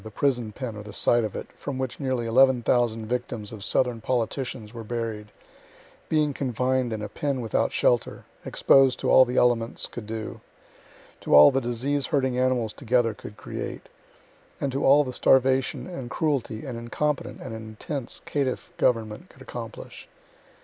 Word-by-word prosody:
the 110 - -8
prison 120 -2 0
pen 115 0 -6
or 105 - -7
the 105 0 -9
site 120 +3 +2
of 105 - -4
it, - - -4
from 140 -2 -6
which 130 -1 -4
nearly 130 -4 -1
11,000 120 -2 +3
victims 120 -2 -4
of 105 -3 -8
southern 120 0 0
politicians 120 -2 -2
were 115 -1 -7
buried, 110 -2 -4 0.8
being 150 -2 +2
confined 130 -1 0
in 110 -1 -3
a - - -3
pen 140 -3 -2
without 115 -3 0
shelter, 120 -1 +1 0.2
exposed 135 -2 +4
to - - 0
all 130 - +8
the 125 +1 -3
elements 120 -1 +2
could 115 -3 -8
do, 110 0 -6 0.8
to - - +2
all 75 0 +10
the 135 - 0
disease 130 +3 -1
herding 130 -3 +1
animals 125 -4 +1
together 120 -3 +1
could 105 0 -11
create, - - -6 0.7
and 140 - -1
to 135 +2 -2
all 145 +2 +6
the 130 -2 -6
starvation 130 +1 +3
and 135 -9 -7
cruelty 135 -7 -1
an 130 -3 -5
incompetent 125 +2 -2
and 130 - -7
intense 110 +4 -5
caitiff 140 -3 -2
government 110 -4 0
could - - -15
accomplish. - - -8
125 Hz, 165 wpm, -26 LUFS, 115-130 Hz, 0.8 s, all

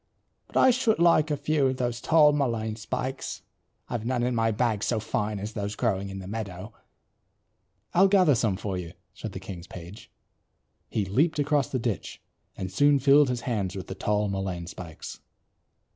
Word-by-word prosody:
But - - -4
I 260 - +7
should 235 -3 +2
like 165 -2 +4
a 150 - 0
few 145 -1 +1
of 130 0 -1
those 120 -2 -2
tall 155 -2 +5
mullein 115 -6 -1
spikes. 130 +4 -4 0.4
I've 115 -3 -3
none 120 0 0
in 125 +1 +1
my 115 -1 +2
bag 110 -1 0
so 115 - +1
fine 105 -1 -2
as 105 +3 -5
those 100 0 -3
growing 100 -5 -1
in 95 - -6
the 95 - -7
meadow." 100 -1 -6 1.2
"I'll 190 +3 +6
gather 185 -6 +5
some 110 -6 +1
for 95 -3 -3
you" 85 -1 -7 0.2
said - - -7
the - - -5
king's 90 -2 -8
page. 90 +3 -10 0.8
He 105 - -1
leaped 145 - +1
across 145 -1 +1
the 130 - -1
ditch, 115 -4 -3 0.4
and 95 0 -4
soon 145 +8 +4
filled 140 +1 +5
his 125 -1 -2
hands 100 -8 -2
with 95 - -5
the - - -6
tall 105 +1 0
mullein 95 -3 -3
spikes. 85 -2 -9
115 Hz, 180 wpm, -27 LUFS, 100-140 Hz, 1.2 s, I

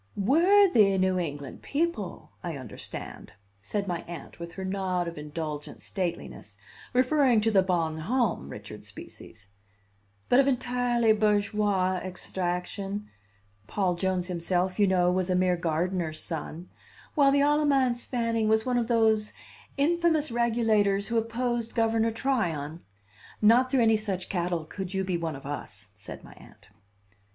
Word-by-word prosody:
"Worthy 285 - +5
New 185 0 +2
England 145 -5 -5
people, 290 - -3
I 170 -4 -4
understand," 120 -7 -8 0.3
said 200 - -3
my 175 -2 -2
Aunt 170 -2 -9
with 170 0 -7
her 190 +1 -5
nod 185 -2 -1
of 170 - -5
indulgent 150 0 -6
stateliness, 185 -4 -5 0.3
referring 255 -1 +3
to 225 +1 +2
the 195 -3 +5
Bon 165 -4 0
Homme 210 - 0
Richard - - -9
species, 105 -3 -12 0.8
"but 245 - +5
of 275 - +4
entirely 245 -3 +2
bourgeois 205 -3 +1
extraction 185 +3 -4 0.6
Paul 190 - 0
Jones 185 0 -1
himself, 180 +2 -1
you 205 - +5
know, 180 -1 +3
was 185 0 0
a 185 - +2
mere 180 0 +3
gardener's 170 -1 -1
son 165 +1 -5 0.4
while 280 -3 +5
the 280 0 +3
Alamance 280 -4 +2
Fanning 230 -3 0
was 220 0 +3
one 250 -1 +1
of 230 - -1
those 220 -2 +2 0.4
infamous 315 0 +2
regulators 220 -4 +2
who 235 - 0
opposed 235 0 -2
Governor 225 0 +2
Tryon. 175 - -1 0.6
Not 235 +4 +5
through 255 -2 +3
any 225 -1 +4
such 195 -4 -3
cattle 175 -3 -1
could 190 +3 -6
you 190 - 0
be 185 -1 -1
one 165 -3 -3
of 135 - -11
us," 105 -8 -7
said 105 0 -10
my - - -13
Aunt. - - -17
200 Hz, 145 wpm, -27 LUFS, 175-235 Hz, 0.8 s, Worthy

